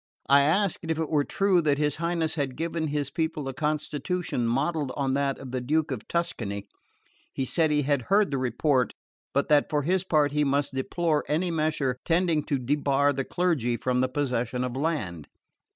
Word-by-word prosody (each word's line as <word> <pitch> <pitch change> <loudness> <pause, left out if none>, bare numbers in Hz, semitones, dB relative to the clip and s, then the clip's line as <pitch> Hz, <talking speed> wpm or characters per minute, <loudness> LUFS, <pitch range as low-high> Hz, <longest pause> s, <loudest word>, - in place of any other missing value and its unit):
I 140 +1 +6
asked 175 +6 +2
if 160 -2 -2
it 160 -1 -2
were 150 -2 +3
true 195 +2 +2
that 145 -3 +2
his 150 -1 0
Highness 170 -1 -1
had 140 -5 -2
given 165 +1 -2
his 145 -2 -2
people 160 -3 -2
a 135 - -3
constitution 150 -1 -2
modelled 140 +3 0
on 135 -2 0
that 140 0 0
of 135 -2 -9
the 130 -1 -2
Duke 155 +4 0
of 125 -5 -5
Tuscany. 105 -12 -2 0.6
He 135 - -2
said 160 +3 +2
he 150 -1 +2
had 140 -1 +1
heard 205 -2 +4
the 135 - 0
report; 130 +1 +1 0.4
but 140 - +1
that 150 -1 +4
for 150 -1 0
his 185 +4 +1
part 150 -6 +2
he 150 0 +1
must 140 0 0
deplore 150 +3 0
any 170 +4 0
measure 155 -5 0
tending 170 -2 +2
to 140 - 0
debar 140 +2 +1
the 135 0 -2
clergy 140 -9 0
from 125 0 0
the 130 - +1
possession 125 -3 -1
of 125 -1 -3
land. 130 - -2
145 Hz, 190 wpm, -27 LUFS, 130-160 Hz, 0.6 s, I